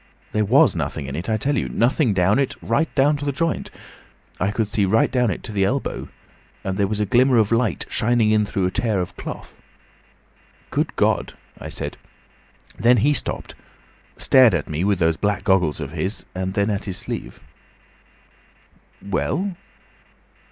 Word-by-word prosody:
There 105 Hz, 0 st, +1 dB
was -, -, +4 dB
nothing 70 Hz, -, -3 dB
in 70 Hz, +1 st, -5 dB
it, 85 Hz, +7 st, -4 dB
I 110 Hz, -, +2 dB
tell 140 Hz, +7 st, 0 dB
you. -, -, -1 dB
Nothing 125 Hz, +1 st, +2 dB
down 95 Hz, +5 st, +2 dB
it, 135 Hz, -, 0 dB
right 120 Hz, +8 st, 0 dB
down 145 Hz, +2 st, +3 dB
to 145 Hz, -, -5 dB
the 140 Hz, -, 0 dB
joint. 165 Hz, +4 st, -2 dB, 0.7 s
I 95 Hz, -, +1 dB
could 110 Hz, +1 st, -1 dB
see 105 Hz, -1 st, 0 dB
right 105 Hz, +4 st, +2 dB
down 125 Hz, -3 st, +2 dB
it 95 Hz, -, -4 dB
to 115 Hz, -, -6 dB
the 100 Hz, -2 st, +1 dB
elbow, 130 Hz, +8 st, -2 dB, 0.5 s
and 95 Hz, -1 st, -2 dB
there 100 Hz, 0 st, +1 dB
was 105 Hz, +1 st, -2 dB
a 105 Hz, -, +1 dB
glimmer 125 Hz, +5 st, +4 dB
of 110 Hz, -1 st, +3 dB
light 115 Hz, -4 st, +1 dB
shining 110 Hz, -2 st, +2 dB
through 100 Hz, -2 st, -1 dB
a 90 Hz, -, 0 dB
tear 110 Hz, -3 st, 0 dB
of 90 Hz, 0 st, -4 dB
the -, -, -10 dB
cloth. -, -, -8 dB, 1.1 s
'Good -, -, -1 dB
God!' -, -, +1 dB, 0.3 s
I -, -, -7 dB
said. -, -, -5 dB, 0.8 s
Then 120 Hz, +2 st, +4 dB
he 150 Hz, -, +4 dB
stopped. -, -, -2 dB, 0.6 s
Stared 125 Hz, -7 st, +5 dB
at 75 Hz, -, -2 dB
me 80 Hz, +2 st, -2 dB
with 100 Hz, 0 st, +2 dB
those 80 Hz, -2 st, +1 dB
black 105 Hz, -1 st, -1 dB
goggles 90 Hz, -6 st, +2 dB
of 75 Hz, -3 st, -5 dB
his, 95 Hz, +6 st, -3 dB
and 95 Hz, +1 st, -3 dB
then 100 Hz, +1 st, +1 dB
at 100 Hz, -, -3 dB
his 95 Hz, -3 st, -4 dB
sleeve." -, -, -5 dB, 1.7 s
"Well?" 185 Hz, -, -1 dB
105 Hz, 180 wpm, -22 LUFS, 95-125 Hz, 1.7 s, Stared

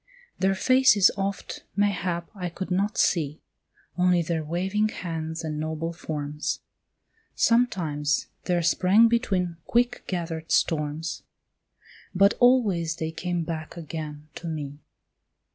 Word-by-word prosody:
Their 190 Hz, 0 st, +2 dB
faces 235 Hz, -2 st, +5 dB
oft, 195 Hz, 0 st, -4 dB
mayhap, 180 Hz, -4 st, 0 dB
I 180 Hz, -4 st, -4 dB
could 185 Hz, +2 st, -6 dB
not 200 Hz, +4 st, 0 dB
see, 155 Hz, -3 st, +1 dB, 0.6 s
Only 180 Hz, -1 st, +3 dB
their 160 Hz, -1 st, -1 dB
waving 190 Hz, +7 st, 0 dB
hands 165 Hz, -4 st, -4 dB
and 155 Hz, -1 st, -3 dB
noble 160 Hz, +2 st, -3 dB
forms. 150 Hz, -3 st, -4 dB, 0.7 s
Sometimes 165 Hz, -12 st, +2 dB, 0.2 s
there 175 Hz, -2 st, +1 dB
sprang 190 Hz, +7 st, +5 dB
between 190 Hz, -8 st, 0 dB
quick 245 Hz, +1 st, +1 dB
gathered 165 Hz, -3 st, -4 dB
storms, 155 Hz, 0 st, 0 dB, 0.9 s
But 200 Hz, +3 st, +5 dB
always 205 Hz, -11 st, +3 dB
they 160 Hz, -1 st, -3 dB
came 175 Hz, +1 st, -2 dB
back 160 Hz, 0 st, -5 dB
again 155 Hz, -2 st, -6 dB
to 170 Hz, -, -7 dB
me. 145 Hz, -3 st, -5 dB
170 Hz, 115 wpm, -26 LUFS, 160-195 Hz, 0.9 s, faces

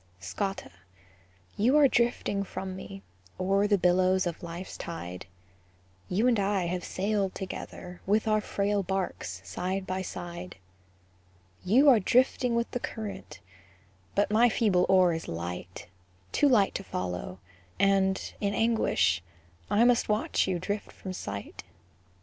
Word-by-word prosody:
Scotta, 100 Hz, -, -4 dB, 0.8 s
you 245 Hz, +8 st, +3 dB
are 290 Hz, -2 st, +7 dB
drifting 235 Hz, -5 st, +1 dB
from 190 Hz, -1 st, -6 dB
me, 195 Hz, +1 st, -9 dB, 0.4 s
O'er 195 Hz, +2 st, +2 dB
the 205 Hz, -1 st, +3 dB
billows 185 Hz, +1 st, +3 dB
of 175 Hz, +1 st, -4 dB
life's 175 Hz, +1 st, -7 dB
tide; 90 Hz, -, -7 dB, 0.8 s
You 205 Hz, +6 st, +1 dB
and 235 Hz, -4 st, +3 dB
I 195 Hz, -2 st, +1 dB
have 180 Hz, +1 st, -2 dB
sailed 200 Hz, 0 st, -1 dB
together, 180 Hz, -1 st, -7 dB
With 210 Hz, +3 st, +2 dB
our 215 Hz, 0 st, +3 dB
frail 205 Hz, 0 st, 0 dB
barks 180 Hz, -, -3 dB
side 185 Hz, -, -3 dB
by 185 Hz, 0 st, -2 dB
side. 175 Hz, 0 st, -7 dB, 1.1 s
You 250 Hz, +10 st, +4 dB
are 255 Hz, -5 st, +8 dB
drifting 250 Hz, +3 st, +2 dB
with 235 Hz, 0 st, -1 dB
the 245 Hz, -, -2 dB
current, 210 Hz, -5 st, -7 dB, 0.7 s
But 205 Hz, -, +2 dB
my 235 Hz, +3 st, +5 dB
feeble 200 Hz, -6 st, +2 dB
oar 185 Hz, -2 st, +5 dB
is 165 Hz, -, -5 dB
light, 90 Hz, +2 st, -6 dB, 0.5 s
Too 290 Hz, -, +3 dB
light 210 Hz, -7 st, +4 dB
to 195 Hz, -, -4 dB
follow; 90 Hz, -, -4 dB, 0.4 s
and, 195 Hz, -1 st, +2 dB
in 200 Hz, 0 st, 0 dB
anguish, 90 Hz, -, +2 dB, 0.5 s
I 215 Hz, -, +4 dB
must 245 Hz, -2 st, +3 dB
watch 210 Hz, -1 st, +1 dB
you 185 Hz, -2 st, 0 dB
drift 205 Hz, +4 st, -4 dB
from 185 Hz, -, -7 dB
sight. 100 Hz, -, -6 dB
195 Hz, 140 wpm, -28 LUFS, 180-210 Hz, 1.1 s, are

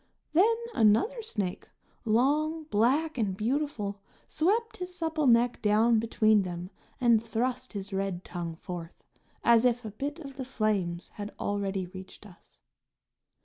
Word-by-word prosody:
Then 415 Hz, +8 st, +5 dB, 0.2 s
another 230 Hz, -, +3 dB
snake, 205 Hz, -, -4 dB, 0.4 s
long, 295 Hz, +8 st, +2 dB
black 270 Hz, +8 st, +2 dB
and 195 Hz, -4 st, 0 dB
beautiful, 220 Hz, -4 st, -2 dB, 0.3 s
swept 440 Hz, +8 st, 0 dB
his 360 Hz, 0 st, -6 dB
supple 320 Hz, -4 st, 0 dB
neck 240 Hz, 0 st, +4 dB
down 220 Hz, +2 st, +4 dB
between 220 Hz, -1 st, +3 dB
them 180 Hz, 0 st, -5 dB, 0.3 s
and 235 Hz, -3 st, +4 dB
thrust 245 Hz, +3 st, -2 dB
his 200 Hz, -1 st, -6 dB
red 195 Hz, -2 st, -2 dB
tongue 170 Hz, -2 st, -5 dB
forth 170 Hz, 0 st, -8 dB, 0.4 s
as 235 Hz, -1 st, +5 dB
if 245 Hz, -1 st, +2 dB
a 215 Hz, -, -5 dB
bit 280 Hz, +8 st, -4 dB
of 275 Hz, -5 st, -10 dB
the 265 Hz, -, -3 dB
flames 200 Hz, -8 st, -1 dB
had 205 Hz, 0 st, -7 dB
already 200 Hz, -2 st, -1 dB
reached 185 Hz, +3 st, -11 dB
us. 185 Hz, -4 st, -18 dB
225 Hz, 140 wpm, -29 LUFS, 200-280 Hz, 0.4 s, Then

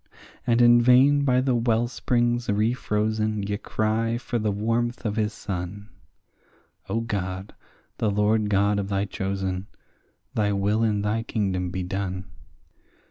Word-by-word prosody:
And 120 Hz, 0 st, +4 dB
in 120 Hz, 0 st, +7 dB
vain 135 Hz, +4 st, +5 dB
by 125 Hz, -1 st, +3 dB
the 130 Hz, -1 st, +1 dB
wellsprings 120 Hz, +1 st, +1 dB
refrozen 110 Hz, -1 st, 0 dB
ye 105 Hz, -, -1 dB
cry 110 Hz, +3 st, -1 dB
for 120 Hz, 0 st, -3 dB
the 105 Hz, -1 st, 0 dB
warmth 115 Hz, +4 st, -1 dB
of 105 Hz, -1 st, -1 dB
his 110 Hz, -1 st, 0 dB
sun— 100 Hz, +1 st, -6 dB, 1.0 s
O 115 Hz, -, 0 dB
God, 95 Hz, -3 st, -4 dB, 0.5 s
the 110 Hz, -, +1 dB
Lord 105 Hz, +1 st, +2 dB
God 100 Hz, +1 st, +2 dB
of 100 Hz, 0 st, -3 dB
thy 100 Hz, 0 st, 0 dB
chosen, 95 Hz, 0 st, -3 dB, 0.7 s
thy 105 Hz, -1 st, +1 dB
will 100 Hz, +3 st, +1 dB
in 105 Hz, -2 st, +1 dB
thy 105 Hz, +2 st, 0 dB
kingdom 95 Hz, -6 st, -1 dB
be 95 Hz, +1 st, -3 dB
done. 95 Hz, 0 st, -3 dB
105 Hz, 135 wpm, -25 LUFS, 100-115 Hz, 1.0 s, in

